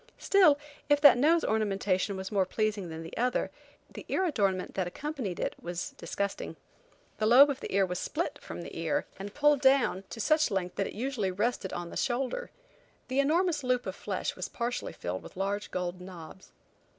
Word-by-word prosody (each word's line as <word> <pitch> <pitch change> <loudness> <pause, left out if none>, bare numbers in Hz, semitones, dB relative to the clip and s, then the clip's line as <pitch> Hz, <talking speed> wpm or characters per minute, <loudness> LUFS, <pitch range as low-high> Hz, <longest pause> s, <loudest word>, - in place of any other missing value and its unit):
Still, 365 -8 +5 0.3
if 290 0 +5
that 285 -3 +9
nose 315 +7 +4
ornamentation 200 -2 0
was 190 +2 -5
more 200 -2 +3
pleasing 210 -3 -1
than 160 0 -6
the 165 - -9
other, 250 +2 0 0.4
the - - -10
ear 375 - +1
adornment 200 - 0
that 185 -2 -1
accompanied 255 - -4
it - - -1
was 175 0 -4
disgusting. 200 +4 -4 0.6
The 215 - +2
lobe 270 +5 +8
of 275 - -5
the - - -6
ear 195 0 +3
was 180 -1 -3
split 335 +3 -3
from - - -7
the - - -9
ear, - - -1
and 200 +1 -7
pulled 295 -1 +4
down 265 -8 +4
to 230 - -8
such 310 +6 +3
length 190 -3 -2
that 195 - 0
it - - -8
usually 230 -4 -1
rested 200 +1 -1
on 175 -1 -5
the - - -5
shoulder. 270 - -1 0.6
The 260 +2 0
enormous 315 +2 +2
loop 250 -1 +1
of - - -4
flesh - - -3
was - - -5
partially 240 +1 -3
filled 90 +2 -4
with - - -13
large 200 +2 -2
gold 180 0 -3
knobs. 180 0 -11
215 Hz, 190 wpm, -30 LUFS, 190-275 Hz, 0.6 s, that